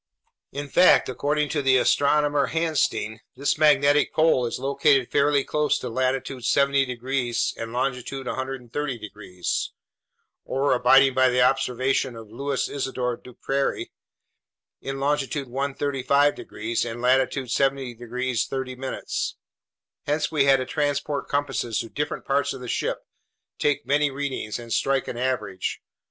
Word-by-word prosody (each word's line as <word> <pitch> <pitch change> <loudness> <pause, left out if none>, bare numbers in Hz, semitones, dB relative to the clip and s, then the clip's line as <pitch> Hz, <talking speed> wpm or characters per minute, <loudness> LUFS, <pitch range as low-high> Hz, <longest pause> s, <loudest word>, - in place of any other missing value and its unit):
In 145 +1 -5
fact, 180 +2 +5
according 145 +3 0
to 150 - 0
the 135 -1 +4
astronomer 145 +2 +3
Hansteen, 155 -9 0 0.2
this 140 +3 0
magnetic 150 -1 +4
pole 155 -6 +3
is - - -4
located 140 -2 +2
fairly 140 -1 +3
close 150 +1 +1
to 125 - -5
latitude 130 +1 -2
70 140 +1 +3
degrees 125 -1 -1
and 115 0 -6
longitude 130 +1 -3
130 130 +1 -4
degrees, 100 -4 -4 0.7
or 140 +2 +1
abiding 135 +2 +5
by 130 0 +4
the 125 0 +3
observations 130 -1 +1
of 110 -2 -11
Louis 140 +3 -2
Isidore 130 -3 -2
Duperrey, 135 +3 -3 0.9
in 135 0 -5
longitude 140 -1 -1
135 140 +2 +1
degrees 110 +2 -3
and 120 0 -5
latitude 130 0 +1
70 135 -2 0
degrees 120 +1 -2
30'. 130 0 -5 1.0
Hence 150 +2 0
we 145 -3 +2
had 135 -1 +6
to 130 - -3
transport 145 0 -2
compasses 140 -5 -1
to 115 - -8
different 150 +4 -4
parts 140 0 +1
of 135 - -8
the 125 - -7
ship, - - -2 0.5
take 145 -4 +1
many 145 +2 +2
readings, 135 -6 -4
and 115 -2 -6
strike 135 -1 +1
an 120 - -5
average. 115 -7 -2
135 Hz, 135 wpm, -24 LUFS, 125-140 Hz, 1.0 s, had